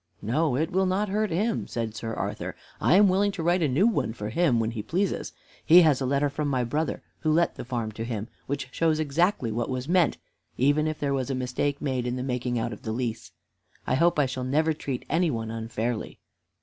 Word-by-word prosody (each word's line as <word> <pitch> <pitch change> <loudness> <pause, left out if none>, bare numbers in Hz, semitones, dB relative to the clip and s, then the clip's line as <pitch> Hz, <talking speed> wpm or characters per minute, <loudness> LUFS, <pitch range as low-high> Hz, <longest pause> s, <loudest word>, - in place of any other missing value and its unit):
"No, 140 +5 +1
it 155 +5 0
will 190 +1 +2
not 195 +3 0
hurt 210 +2 0
him," 210 +7 0
said 115 -2 -3
Sir 115 +1 -4
Arthur. - - -4 0.2
"I - - +4
am 205 +1 +7
willing 200 +2 +2
to 170 - -4
write 175 +2 +2
a 155 - +3
new 145 +10 +3
one 225 - +1
for 105 -2 -5
him 130 -1 +2
when 115 0 0
he 115 -2 -4
pleases. 185 - -1 0.3
He 175 +2 +8
has 150 -4 +3
a 130 - 0
letter 140 +2 +2
from 145 +1 -2
my 130 -3 +1
brother 150 +7 -2 0.2
who 155 - +1
let 170 +2 +3
the - - -7
farm 120 -3 -3
to 110 +1 -5
him, 115 -2 -4 0.2
which 140 -1 -3
shows 160 0 +1
exactly 155 - +1
what 120 +3 -2
was 130 0 -3
meant, 175 -2 +3 0.4
even 145 +4 +3
if 155 -1 -2
there 140 -1 0
was 130 -2 -1
a 135 - -1
mistake 130 +3 -2
made 130 -4 -1
in 125 +1 -2
making 125 -1 -1
out 115 +1 -1
the 110 - -4
lease. 115 -1 -3 0.6
I - - 0
hope 170 +6 +3
I 145 - +4
shall 130 0 -4
never 155 +5 +2
treat 135 -4 -5
any 170 +2 +2
one 115 -4 -3
unfairly." 115 0 -3
140 Hz, 225 wpm, -26 LUFS, 120-165 Hz, 0.6 s, He